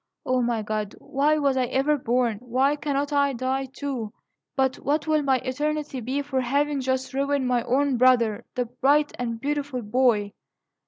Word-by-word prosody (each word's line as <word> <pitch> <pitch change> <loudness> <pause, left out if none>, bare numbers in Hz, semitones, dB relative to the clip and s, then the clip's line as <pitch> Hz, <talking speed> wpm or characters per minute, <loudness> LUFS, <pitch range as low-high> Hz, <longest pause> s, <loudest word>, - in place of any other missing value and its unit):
O 255 0 +1
my 235 -2 0
God! 210 -1 -3
why 295 +3 +1
was 280 -3 +2
I 255 -1 +2
ever 270 +4 +1
born? 245 -4 0
Why 255 +4 +1
cannot 285 0 -2
I 280 -1 +2
die, 260 +2 -1
too? 260 -5 -5 0.4
But 265 -1 +1
what 290 +1 -1
will 310 -1 +2
my 270 -2 +2
eternity 290 +2 -2
be 265 +5 -2
for 270 -2 -1
having 285 +3 0
thus 260 +1 -2
ruined 275 -1 0
my 245 -1 +2
own 270 +1 +1
brother, 235 -3 +3
the 250 - 0
bright 280 +5 +2
and 230 -2 -3
beautiful 280 -2 -2
boy? 215 -2 +2
265 Hz, 170 wpm, -25 LUFS, 245-285 Hz, 0.4 s, brother